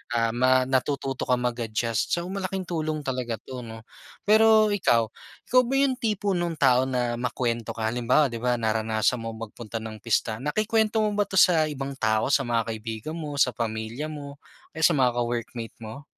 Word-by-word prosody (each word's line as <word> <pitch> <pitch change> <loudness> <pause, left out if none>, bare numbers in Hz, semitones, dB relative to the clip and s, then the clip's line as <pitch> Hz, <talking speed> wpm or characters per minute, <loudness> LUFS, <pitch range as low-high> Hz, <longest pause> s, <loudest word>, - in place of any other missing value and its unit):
ah, 115 -1 +2
ma 130 +2 +3
natututo 135 +1 -1
ka 125 - +4
mag-adjust, 115 -1 -1
so 170 - -3
malaking 190 -1 -3
tulong 155 -3 -3
talaga 125 -3 -2
'to 130 -1 -7
'no. 115 -2 -9 0.4
Pero 215 0 +5
ikaw, 115 - +2 0.3
ikaw 255 +1 +4
ba 270 - -1
'yung 270 -2 +2
tipo 210 -3 0
nung 175 -2 -1
tao 130 -2 +3
na 120 -2 -1
makwento 120 -1 -2
ka, 110 - -4
halimbawa 125 +4 +2
'di 115 - -5
ba 125 0 +1
naranasan 110 +1 0
mo 115 0 -5
magpunta 115 0 -9
ng 110 -1 -7
pista, 110 +1 0
nakikwento 215 - +1
mo 210 - +1
ba 205 0 0
'to - - -6
sa 165 -4 +5
ibang 140 -2 -4
tao 110 +4 +1
sa 135 -3 +2
mga 115 -1 0
kaibigan 110 +6 -5
mo, 155 -2 -5
sa 130 - +5
pamilya 110 +4 -4
mo, 145 -2 -8 0.4
o - - -11
sa - - +5
mga 130 -3 +3
ka-workmate 120 -1 -3
mo? 110 +6 -8
125 Hz, 180 wpm, -26 LUFS, 115-155 Hz, 0.4 s, Pero